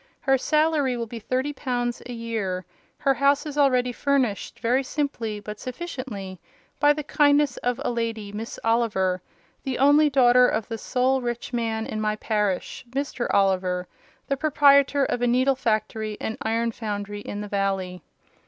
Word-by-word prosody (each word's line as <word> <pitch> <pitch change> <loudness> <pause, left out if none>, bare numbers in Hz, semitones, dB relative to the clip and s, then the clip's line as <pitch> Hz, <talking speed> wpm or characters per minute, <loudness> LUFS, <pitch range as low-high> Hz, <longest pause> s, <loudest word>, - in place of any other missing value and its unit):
Her 270 -1 +3
salary 300 -2 +1
will 235 - -2
be 230 +1 -8
thirty 260 +6 -2
pounds 245 -3 -2
a - - -7
year: 220 -6 -3 0.3
her 275 -2 +2
house 280 +4 +2
is 295 -2 -5
already 255 -4 +3
furnished, 255 -5 -1
very 245 +3 +2
simply, 250 -7 -3
but 210 +1 -8
sufficiently, 250 - -6 0.4
by 290 0 +5
the 300 +1 -1
kindness 285 -2 +3
of 245 +1 -1
a - - +1
lady, 225 -3 -3
Miss 220 +3 -6
Oliver; 210 -6 +1 0.4
the 265 -2 -3
only 290 +3 +5
daughter 250 -2 +5
of 220 - -1
the 225 -2 -5
sole 260 +3 +1
rich 240 +1 -4
man 225 -2 -1
in 215 - -4
my 215 0 0
parish—Mr. 230 +6 -2
Oliver, 185 -2 +1 0.4
the 275 - -1
proprietor 280 -1 +4
of 245 - -2
a 245 - +2
needle 255 +3 +3
factory 215 -3 -1
and 220 - -3
iron 230 +1 0
foundry 205 -2 -5
in 205 0 -6
the 210 - -5
valley. 195 -3 -2
240 Hz, 160 wpm, -25 LUFS, 210-270 Hz, 0.4 s, by